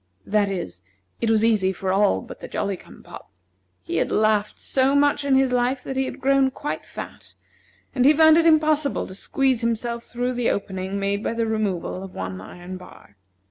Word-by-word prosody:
That 205 -1 +1
is, 90 - -5 0.4
it 230 - 0
was 220 0 +3
easy 210 -5 +2
for 190 0 -2
all 200 +1 +3
but - - -11
the - - -8
Jolly 200 -1 -2
cum - - -16
pop. - - -12 0.5
He 100 - -3
had - - 0
laughed 215 -1 +1
so 270 +1 +1
much 290 0 +3
in 280 -1 +2
his 265 -1 +3
life 250 +1 0
that 270 - -5
he 265 0 +1
had - - -6
grown 270 0 +3
quite 285 +3 -5
fat, - - -9 0.6
and 250 - +1
he 280 - +7
found 315 +1 +6
it 335 - +3
impossible 310 -2 +2
to - - -9
squeeze 260 +5 0
himself 235 0 -2
through 245 +1 -2
the 245 -1 0
opening 190 0 -3
made 200 +1 -1
by 230 - -2
the 230 0 0
removal 205 -5 -2
of 190 -1 -9
one 95 0 -5
iron 180 - -9
bar. 180 - -15
225 Hz, 200 wpm, -23 LUFS, 195-265 Hz, 0.6 s, he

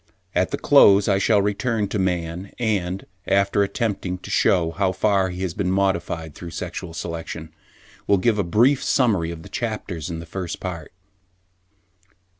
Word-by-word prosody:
At - - +1
the - - -2
close 100 0 +6
I 100 -2 +3
shall 100 0 +3
return 105 +1 0
to 105 - -2
man, 90 0 -2
and, 100 -5 -1 0.2
after 100 +1 +2
attempting 100 -3 -1
to - - -7
shew 85 -3 +3
how 95 +2 0
far 95 -1 +2
he 90 +1 -5
has 90 -3 -2
been 90 +1 -1
modified 85 -5 -1
through 85 +3 -8
sexual 90 -1 -6
selection, 80 -1 -6 0.5
will 100 - +4
give 105 +2 +1
a - - +2
brief 120 +10 +3
summary 105 - +2
of 85 -1 -7
the - - -10
chapters 100 -8 -4
in 85 - -4
this 80 0 -8
First 90 -1 -5
Part. 85 -5 -6
95 Hz, 165 wpm, -23 LUFS, 85-100 Hz, 0.5 s, close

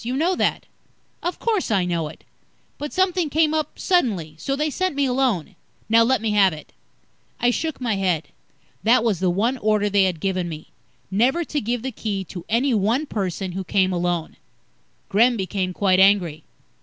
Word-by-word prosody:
You 250 +3 -2
know 345 +5 +1
that." - - 0 0.6
"Of 350 - -3
course, 435 - -1
I 195 -5 +2
know 170 -3 -1
it. 150 - -12 0.6
But 295 0 -4
something 365 -3 +1
came 310 +1 +2
up 310 -1 -2
suddenly, 215 - 0
so 275 - -2
they 300 +2 -1
sent 370 0 -1
me 285 0 +1
alone. 250 - 0 0.3
Now, 225 +1 +6
let 230 -1 +2
me 220 - 0
have 195 -4 +4
it." 155 - -11 0.7
I 245 - +3
shook 315 +4 -3
my 230 -5 -1
head. 180 -5 0 0.5
That 230 +1 +4
was 215 -7 +1
the 185 -1 +1
one 230 +9 0
order 210 -1 +1
they 200 -1 +4
had 180 -4 -1
given 185 -1 -1
me 155 -1 -9 0.4
never 255 - +2
to 300 -2 -3
give 240 +1 -2
the 265 - -3
Key 205 -4 -3
to 180 -1 -9
any 245 +4 +2
one 225 +8 +1
person 190 - -3
who 190 +2 -4
came 190 0 +1
alone. 175 -2 -2 0.7
Gremm 235 +4 +3
became 190 -1 -2
quite 185 0 +2
angry. 185 -6 +3
215 Hz, 185 wpm, -22 LUFS, 185-265 Hz, 0.7 s, Now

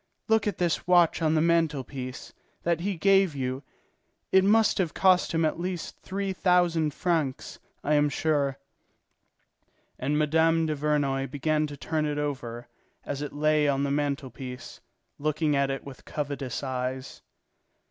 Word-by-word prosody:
Look 220 -2 +2
at 205 - -1
this 175 -1 -1
watch 175 -2 +4
on 160 0 +2
the 155 - +3
mantel 165 -4 +2
piece, 130 0 -8 0.3
that 170 -1 +1
he 195 +3 -2
gave 195 -2 +3
you: 130 0 -3 0.7
it 190 0 +5
must 215 +2 +4
have 175 -5 -1
cost 185 -1 +4
him 165 0 +1
at 155 - -1
least 180 -1 -4
three 195 0 -3
thousand 175 -4 +2
francs, 155 -5 -2 0.2
I 150 - +1
am 145 0 +3
sure." 145 -3 0 1.4
And 145 +3 0
Mme. 160 +2 +3
Duvernoy 145 -3 0
began 150 +3 0
to 145 -1 -9
turn 155 +1 -1
it 145 0 -2
over, 120 -5 -4 0.4
as 145 0 -4
it 145 - -4
lay 150 0 +2
on 140 -1 +1
the 140 - 0
mantel 140 -2 -1
piece, 125 +1 -9 0.4
looking 155 0 0
at 140 0 +2
it 135 0 -3
with 135 -2 -11
covetous 140 -3 -4
eyes. 130 0 -4
150 Hz, 155 wpm, -27 LUFS, 140-170 Hz, 1.4 s, it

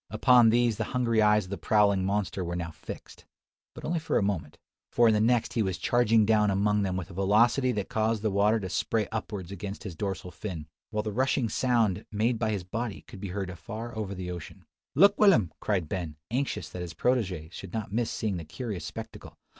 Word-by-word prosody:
Upon 120 +1 +5
these 120 -1 +2
the - - 0
hungry 115 -3 +2
eyes 105 0 +4
of 90 - -12
the 100 - -4
prowling 100 +1 +3
monster 100 -1 -1
were 85 0 -3
now 85 -1 -4
fixed; - - -10 0.5
but - - -8
only 170 +1 0
for 160 - 0
a - - +2
moment: 85 -7 -2 0.3
for 120 -1 +4
in 110 - +5
the 105 - +2
next 120 +1 +2
he 115 - +1
was 95 -4 -1
charging 115 +3 +3
down 105 -1 +3
among 105 +2 +2
them 95 -2 -1
with 90 0 -5
a - - -10
velocity 110 +7 +3
that 105 -3 -2
caused 110 0 0
the 110 - +1
water 105 +3 +3
to 95 - -4
spray 105 +3 0
upwards 105 -4 -5
against 100 +1 -6
his 100 -5 -6
dorsal 95 0 -4
fin, 85 -5 -6 0.2
while 105 -1 -2
the 110 - -3
rushing 130 +1 +1
sound 115 -5 +1
made 110 +3 +1
by 110 - 0
his 100 -4 -2
body 115 +4 -4
could 95 - -12
be 100 - -4
heard 95 0 -3
afar 110 +7 -7
off 115 - -10
over 100 -2 -4
the 90 -1 -5
ocean, 85 -2 -9 0.3
"Look, 200 +7 +6
Will'm!" 170 - +5
cried 95 -6 -1
Ben, 85 -4 -4 0.2
anxious 125 - -1
that 90 +3 -7
his 85 -4 -6
protege 95 -9 0
should 95 0 -9
not 105 -2 -4
miss 115 0 0
seeing 105 -4 -2
the 85 - -5
curious 105 - -5
spectacle. - - -8
105 Hz, 220 wpm, -28 LUFS, 95-115 Hz, 0.5 s, Look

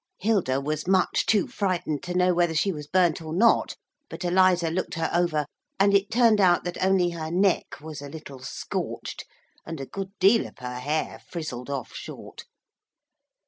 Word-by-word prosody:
Hilda 185 -11 +1
was 155 +3 -3
much 190 -1 +2
too 210 -4 +3
frightened 180 -7 -2
to 180 0 -5
know 180 0 +3
whether 175 -2 +1
she 195 +5 +2
was 150 -4 -7
burnt 175 -2 +2
or 160 -1 -7
not, 225 +8 +3 0.3
but 175 +2 -6
Eliza 180 -2 +3
looked 185 +2 -2
her 165 -1 -1
over, 170 -4 +1 0.3
and 200 +1 +4
it 200 0 +3
turned 225 -2 +4
out 175 -2 +4
that 175 +1 -4
only 185 -2 +3
her 160 -2 -5
neck 185 +2 +1
was 155 -1 -8
a 145 - -8
little 140 -3 -9
scorched, 130 - -5 0.4
and 165 -2 -7
a 135 - -4
good 195 +6 -6
deal 200 +5 +4
of - - -17
her 125 0 -6
hair 150 +5 -2
frizzled 140 -7 -5
off 135 -3 -4
short. - - -9
175 Hz, 180 wpm, -26 LUFS, 155-190 Hz, 0.4 s, and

